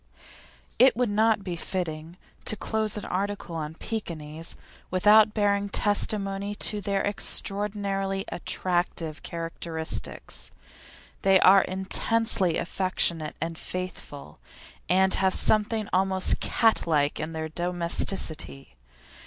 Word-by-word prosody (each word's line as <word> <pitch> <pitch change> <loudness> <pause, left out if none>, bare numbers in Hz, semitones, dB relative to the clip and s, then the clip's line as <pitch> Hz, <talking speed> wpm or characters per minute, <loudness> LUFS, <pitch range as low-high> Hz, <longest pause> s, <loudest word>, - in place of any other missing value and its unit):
It - - +6
would 245 -4 +1
not 215 0 +2
be 180 -3 -4
fitting 165 -2 -5 0.3
to - - -1
close 215 0 -1
an 210 - -6
article 195 -2 -3
on 155 0 -5
Pekinese 165 -7 -6 0.3
without 210 +3 +5
bearing 200 -1 +1
testimony 205 -1 0
to 210 0 -1
their 200 0 -1
extraordinarily 195 -1 -1
attractive 175 -3 -2
characteristics. 165 -1 -1 0.7
They 195 -1 +5
are 195 +1 +7
intensely 190 0 +1
affectionate 170 -3 0
and 165 +1 -4
faithful, 180 - -7 0.5
and 190 +1 +4
have 190 -1 +2
something 215 0 +1
almost 190 0 +2
cat 225 -6 +2
like 145 -3 +1
in 155 +1 -4
their 160 0 -4
domesticity. 170 - -1
190 Hz, 105 wpm, -26 LUFS, 165-205 Hz, 0.7 s, are